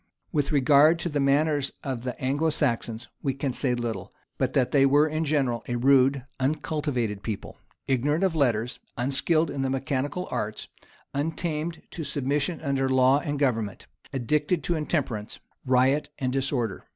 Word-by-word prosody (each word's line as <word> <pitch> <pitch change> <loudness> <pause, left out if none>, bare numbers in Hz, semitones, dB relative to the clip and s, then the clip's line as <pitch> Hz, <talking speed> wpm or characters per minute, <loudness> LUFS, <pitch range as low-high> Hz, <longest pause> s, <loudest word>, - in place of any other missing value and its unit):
[] - - -48
With 145 -1 0
regard 145 +3 +5
to 175 - -3
the 145 -2 -1
manners 140 0 +2
of 130 -4 -3
the 125 0 -5
Anglo 145 +5 +1
Saxons, 120 -6 -1
we 135 -2 -1
can 135 -2 -2
say 125 -2 0
little, 115 -5 -4 0.3
but - - 0
that 130 -3 +2
they 140 -2 +5
were 145 +3 +5
in 155 +1 -1
general 135 -6 0
a 120 - -2
rude, 135 +1 +4
uncultivated 130 -6 -1
people, 105 -2 -6 0.3
ignorant 145 +6 +1
of 190 -3 +2
letters, 120 -6 0 0.2
unskilled 145 +5 +2
in 140 - -3
the 135 - 0
mechanical 135 +6 -2
arts, 105 0 -3 0.5
untamed 160 +2 -2
to 165 - -5
submission 145 +3 -1
under 135 -3 0
law 130 +1 +4
and 145 0 -3
government, 115 -8 -1 0.3
addicted 150 +6 0
to 175 - 0
intemperance, 135 -9 -2 0.3
riot, 130 +3 +3
and 130 -1 -1
disorder. 130 -6 -1
140 Hz, 160 wpm, -26 LUFS, 125-150 Hz, 0.5 s, regard